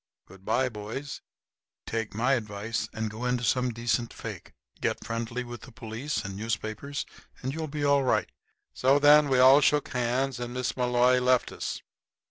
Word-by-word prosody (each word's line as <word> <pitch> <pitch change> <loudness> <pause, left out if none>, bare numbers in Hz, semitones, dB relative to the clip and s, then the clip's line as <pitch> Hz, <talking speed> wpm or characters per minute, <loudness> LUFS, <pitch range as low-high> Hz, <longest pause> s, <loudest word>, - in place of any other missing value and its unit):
Good 95 +1 -16
by, 130 +6 +1
boys. 115 +5 -6 0.6
Take 115 -2 -3
my 125 +5 +2
advice 110 -1 -2
and 110 -1 -3
go 110 +3 -7
into 125 -1 0
some 125 0 +1
decent 115 0 -1
fake. - - -8 0.3
Get - - -1
friendly 115 +2 -3
with 120 -2 -8
the - - -12
police 115 +6 -4
and 95 -1 -5
newspapers 110 +6 -3 0.4
and 130 +1 -2
you'll 160 0 -3
be 150 0 -4
all 140 -1 +4
right." 130 - +1 0.4
So 135 +2 +3
then 145 0 +6
we 130 - +3
all 130 +3 +8
shook 150 0 +2
hands, 125 +1 -1
and 120 0 -5
Miss 125 0 -2
Malloy 125 0 +3
left 125 0 +2
us. - - -5
125 Hz, 170 wpm, -28 LUFS, 115-135 Hz, 0.6 s, all